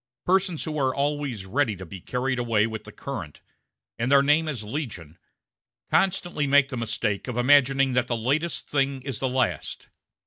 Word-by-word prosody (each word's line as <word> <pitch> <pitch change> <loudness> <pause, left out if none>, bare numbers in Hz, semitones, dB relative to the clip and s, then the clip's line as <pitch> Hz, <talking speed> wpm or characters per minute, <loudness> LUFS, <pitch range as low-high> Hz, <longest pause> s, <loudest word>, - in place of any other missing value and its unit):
Persons 185 -3 +1
who 155 -1 -3
are 130 -2 +1
always 140 -7 -2
ready 110 +1 0
to 95 0 -9
be 95 +2 -9
carried 125 +3 -2
away 115 -3 +2
with 110 -1 -5
the 105 - -10
current 105 - -7 0.6
and 120 +3 0
their 140 0 +6
name 150 +3 +3
is 130 -8 -3
legion 105 - -6 0.7
constantly 175 -6 +1
make 140 0 +5
the - - -4
mistake 110 -3 -2
of 125 -2 -4
imagining 135 +1 +4
that 125 -1 +1
the 120 - -1
latest 145 +9 -1
thing 135 -2 0
is 135 -4 -4
the 130 - 0
last. 130 -3 -2
130 Hz, 175 wpm, -25 LUFS, 115-145 Hz, 0.7 s, their